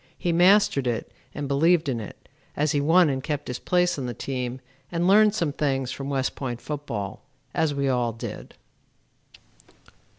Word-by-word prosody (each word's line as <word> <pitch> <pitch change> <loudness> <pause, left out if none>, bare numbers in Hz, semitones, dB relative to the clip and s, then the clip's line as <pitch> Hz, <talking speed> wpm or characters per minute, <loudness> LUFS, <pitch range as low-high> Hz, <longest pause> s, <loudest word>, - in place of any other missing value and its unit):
He 175 - -1
mastered 175 -6 +4
it 120 -2 -2 0.2
and 145 -1 -3
believed 160 +4 +3
in 125 -4 -1
it, 105 - -10 0.3
as 150 0 +2
he 145 - +1
won 165 +4 +5
and 135 -2 -2
kept 145 -2 -3
his 125 - -4
place 180 -3 +1
on 130 - -3
the 120 - -5
team 125 0 -4 0.3
and 175 +1 0
learned 210 +2 +5
some 165 -8 0
things 135 -4 -1
from 140 0 -5
West 135 -2 -1
Point 125 -3 -4
football, 125 -10 -5 0.3
as 155 -3 +1
we 140 0 0
all 125 -3 +1
did. 115 - -8
140 Hz, 170 wpm, -25 LUFS, 130-170 Hz, 0.3 s, won